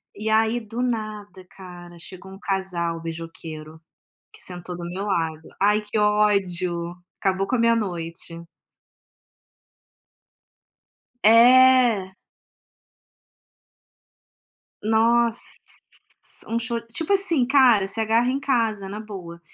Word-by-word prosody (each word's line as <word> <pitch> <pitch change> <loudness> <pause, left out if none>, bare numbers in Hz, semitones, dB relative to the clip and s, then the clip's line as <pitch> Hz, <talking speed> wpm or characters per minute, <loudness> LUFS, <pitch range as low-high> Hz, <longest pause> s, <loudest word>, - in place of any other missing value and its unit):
E 215 +1 -4
aí, 220 +2 +2
do 230 +2 -6
nada, 215 -5 -4
cara, 175 -2 -12
chegou 190 +2 -11
um 195 - -12
casal 180 -4 -2
beijoqueiro, 160 -1 -8 0.5
que - - -13
sentou 180 0 -6
do 175 - -7
meu 190 +3 -5
lado, 160 -5 -2 0.2
ai 210 +1 +3
que 210 +1 -4
ódio, 185 -5 +1 0.2
acabou 195 0 0
com 255 - 0
a - - -3
minha 230 0 +3
noite. 170 -4 -4 2.8
É. 235 -3 +6 2.7
Nossa, 230 +2 +2 1.1
um 230 +1 -1
sh 235 +1 -5 0.2
tipo 325 +9 -2
assim, 345 -9 +2
cara, 250 -7 +4
se 225 +3 -3
agarra 230 +3 +2
em 270 - -1
casa, 225 -7 0
na 210 +2 -6
boa. 180 -6 -9
205 Hz, 110 wpm, -23 LUFS, 175-230 Hz, 2.8 s, É